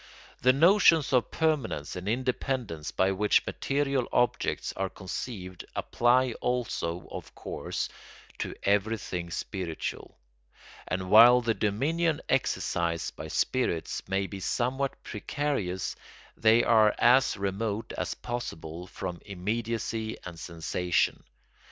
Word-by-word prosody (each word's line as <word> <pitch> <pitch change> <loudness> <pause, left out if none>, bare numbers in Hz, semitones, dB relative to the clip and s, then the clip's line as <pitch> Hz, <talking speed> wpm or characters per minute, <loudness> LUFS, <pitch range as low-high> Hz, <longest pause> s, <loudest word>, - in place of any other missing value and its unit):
The 130 - +6
notions 165 0 +5
of 125 -2 +3
permanence 145 - -1
and 90 +2 -4
independence 125 - -2
by 95 +1 +2
which 105 +2 +2
material 140 -2 0
objects 120 -2 0
are 95 0 -1
conceived 95 -1 -6
apply 125 +1 +2
also, 110 -9 -2
of - - -8
course, - - -4 0.5
to - - -3
everything 100 -4 0
spiritual; 85 -1 -5 0.7
and 95 0 -3
while 120 +3 +9
the 115 -1 +1
dominion 150 +11 0
exercised 85 -1 0
by - - -7
spirits 125 -11 0
may 95 +1 0
be 95 0 -7
somewhat 130 +7 -1
precarious, 105 -6 -2 0.4
they 115 +1 +5
are 110 -2 +5
as 125 +1 +4
remote 100 +2 -2
as - - -3
possible 90 -8 -6
from 90 -2 -6
immediacy 110 +3 -3
and 85 -2 -8
sensation. 85 +1 -1
110 Hz, 110 wpm, -28 LUFS, 95-125 Hz, 0.7 s, while